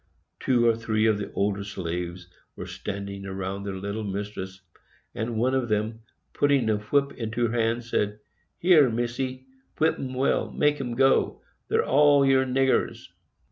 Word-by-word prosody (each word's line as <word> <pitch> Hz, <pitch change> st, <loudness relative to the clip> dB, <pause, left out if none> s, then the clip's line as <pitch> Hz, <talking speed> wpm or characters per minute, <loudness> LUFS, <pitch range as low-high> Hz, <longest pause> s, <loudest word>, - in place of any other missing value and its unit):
Two 120 Hz, -2 st, +2 dB
or 115 Hz, -1 st, +4 dB
three 110 Hz, -1 st, 0 dB
of 110 Hz, -2 st, +3 dB
the 105 Hz, -, -5 dB
older 100 Hz, 0 st, 0 dB
slaves 90 Hz, -2 st, -5 dB, 0.3 s
were -, -, -7 dB
standing 100 Hz, -1 st, -6 dB
around 95 Hz, +1 st, -4 dB
their 100 Hz, -1 st, -4 dB
little 100 Hz, +3 st, -4 dB
mistress, 100 Hz, -1 st, -5 dB, 0.5 s
and 115 Hz, 0 st, -3 dB
one 125 Hz, +4 st, +1 dB
of 130 Hz, -3 st, 0 dB
them, 110 Hz, +1 st, -1 dB, 0.3 s
putting 140 Hz, -6 st, +2 dB
a 105 Hz, -, +1 dB
whip 140 Hz, +7 st, +1 dB
into 115 Hz, 0 st, -2 dB
her -, -, -4 dB
hand, 115 Hz, +1 st, 0 dB
said, 105 Hz, -3 st, -1 dB, 0.5 s
"There, 160 Hz, -7 st, +6 dB
Misse, 120 Hz, +3 st, -3 dB, 0.3 s
whip 160 Hz, +1 st, +2 dB
'em 130 Hz, -1 st, -5 dB
well; 130 Hz, +2 st, +1 dB
make 150 Hz, -1 st, +1 dB
'em 120 Hz, -3 st, -4 dB
go,—they're 135 Hz, +2 st, +1 dB
all 145 Hz, 0 st, +5 dB
your 135 Hz, -1 st, +4 dB
niggers." 130 Hz, +1 st, +1 dB
115 Hz, 155 wpm, -26 LUFS, 100-130 Hz, 0.5 s, There